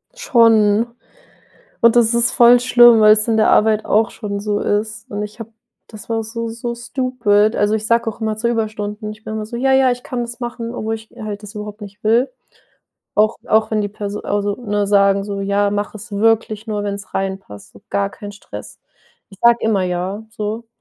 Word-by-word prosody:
Schon. 230 - +3 0.9
Und 235 0 +5
das 235 -1 +4
ist 235 0 +2
voll 240 0 +6
schlimm, 240 -2 +6
weil's 215 +1 +5
in 225 - +2
der 215 - +4
Arbeit 215 0 +3
auch 220 +2 +2
schon 200 -2 -5
so 205 0 -1
ist. 215 +1 -2
Und 205 0 -3
ich 210 +1 -9
habe 225 0 -8 0.4
das 215 +1 -12
war 225 -1 -1
so 230 +1 -5
so 235 +1 -5
stupid. 235 -4 +1
Also 205 +1 +1
ich 215 0 -3
sage 230 0 +2
auch 225 - -11
immer 220 -1 -2
zu 235 +2 -1
Überstunden. 215 -2 -3
Ich 215 +1 -13
bin 220 - -6
immer 215 -1 -4
so: 235 +2 -7
„Ja, 265 +1 +2
ja, 265 -1 +4
ich 245 0 -4
kann 245 -1 -4
das 240 +1 -6
machen“, 240 -1 -5
obwohl 225 -2 -3
ich 220 0 -13
halt 210 -1 -6
das 210 +1 -10
überhaupt 210 0 -7
nicht 205 +1 -11
will. 230 - +2 0.8
Auch 215 +1 +2
auch 220 +1 +2
wenn 215 -1 +1
die 205 - -2
Perso 205 0 -6
also 205 0 -1
ne 205 -4 -2
sagen 200 -1 +3
so: 200 -1 -4
„Ja, 200 +1 +1
mach 205 +1 -3
es 215 +2 -10
wirklich 220 +1 +1
nur, 210 -2 -3
wenn's 200 -1 -6
reinpasst, 190 - -5
so 100 - -17
gar 100 0 0
keinen 205 -1 -9
Stress.“ 200 - -11 0.5
Ich 195 - -15
sage 235 0 +5
immer: 210 -4 +1
„Ja“ 185 +4 -3
so. 215 +2 -5
215 Hz, 205 wpm, -18 LUFS, 205-230 Hz, 0.9 s, voll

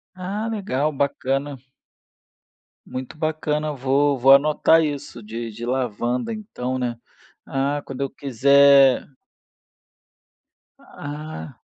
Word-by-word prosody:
Ah, 195 +4 -4
legal, 155 - -1
bacana. 140 0 -2 1.3
Muito 130 +3 -7
bacana, 155 -1 -1
vou 140 +2 +1
vou 130 +2 +5
anotar 155 +3 +4
isso 145 -5 -4
de 115 +2 -6
de 115 +2 -7
lavanda 125 - -2
então, 130 - -5
né. 120 -2 -2 0.5
Ah, 140 +2 -1
quando 135 - -8
eu 135 -1 -1
quiser 140 0 +4 1.7
Ah. 145 - -8
140 Hz, 95 wpm, -22 LUFS, 130-150 Hz, 1.7 s, vou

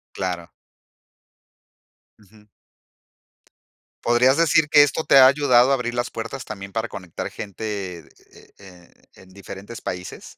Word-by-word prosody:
Claro. 90 -3 -4 1.7
Ujú. 105 +1 -22 1.6
¿Podrías 125 +3 +3
decir 160 -1 +3
que 145 -1 +7
esto 145 +2 +1
te 140 - +4
ha 130 - +9
ayudado 130 -2 +4
a - - +4
abrir 120 -2 -4
las 120 0 -2
puertas 115 +3 -6
también 100 -2 -9
para 115 +2 -3
conectar 90 -3 -7
gente 100 -3 -10
de 95 -9 -8
e 100 - -16 0.5
e - - -17
en 95 - -18
diferentes 100 +3 -10
países? 90 0 -7
110 Hz, 135 wpm, -22 LUFS, 95-130 Hz, 1.7 s, ha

